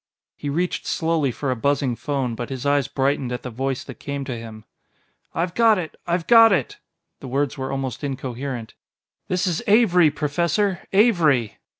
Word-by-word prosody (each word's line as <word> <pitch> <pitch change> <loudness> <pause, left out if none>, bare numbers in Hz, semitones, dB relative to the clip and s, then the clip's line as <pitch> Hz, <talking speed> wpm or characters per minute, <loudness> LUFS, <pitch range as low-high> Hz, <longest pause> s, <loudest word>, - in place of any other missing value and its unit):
He 145 - -5
reached 175 +5 -2
slowly 160 -4 0
for 135 +2 -3
a - - 0
buzzing 140 0 0
phone, 135 -2 -2
but 120 +1 -5
his 130 0 -5
eyes 140 -1 +2
brightened 135 -2 0
at 125 - -4
the 125 - -6
voice 130 +2 -2
that 130 - -11
came 140 -1 -4
to 130 -2 -4
him. 110 -2 -9 0.7
"I've 170 +1 -1
got 225 -1 +4
it 170 -4 -5
I've 170 -1 0
got 225 +1 +7
it!" 160 -10 0 0.4
The 135 - -9
words 140 +2 -1
were 130 -2 -4
almost 135 -1 -4
incoherent. 130 -3 -5 0.5
"This 180 0 0
is 175 -4 -1
Avery, 195 -7 +5
Professor 170 +6 -1
Avery! 170 - +3
140 Hz, 175 wpm, -22 LUFS, 130-170 Hz, 0.7 s, got